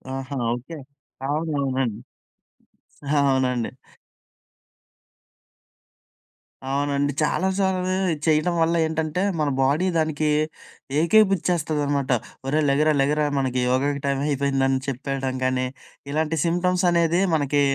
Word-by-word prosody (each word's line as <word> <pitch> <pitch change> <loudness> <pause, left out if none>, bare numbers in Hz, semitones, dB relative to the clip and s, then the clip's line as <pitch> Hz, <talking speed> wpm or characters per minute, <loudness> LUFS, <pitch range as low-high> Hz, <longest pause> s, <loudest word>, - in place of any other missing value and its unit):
ఆహా! 135 +1 -5 0.2
ఓకె. 130 +7 -7 0.5
అవునవునండి. 140 -6 -1 1.1
ఆ! - - -5 0.2
అవునండి. 125 -3 0 3.0
అవునండి. 140 +1 0
చాలా 185 +5 +1
సార్లు 185 -1 0 0.4
చేయడం 155 +3 +3
వల్ల 165 +1 +2
ఏంటంటే 160 +2 -2 0.2
మన 150 -2 +1
బాడీ 145 +8 +2
దానికి 155 -1 0 0.7
ఏకేపుచ్చేస్తదనమాట. 160 -7 +2 0.3
"ఒరేయ్ 150 +3 +1
లెగరా 150 +3 +3
లెగరా 150 +2 +1
మనకి 130 -1 -1
యోగాకి 140 +2 0
టైమ్ 140 0 0
అయిపోయిందని" 135 -2 +1
చెప్పేయడం 135 0 -3
కానీ 130 0 0 0.4
ఇలాంటి 160 +1 0
సింప్టమ్స్ 180 +2 +1
అనేది 170 +1 +2
మనకి 145 -1 +1
145 Hz, 95 wpm, -23 LUFS, 135-160 Hz, 3.0 s, చేయడం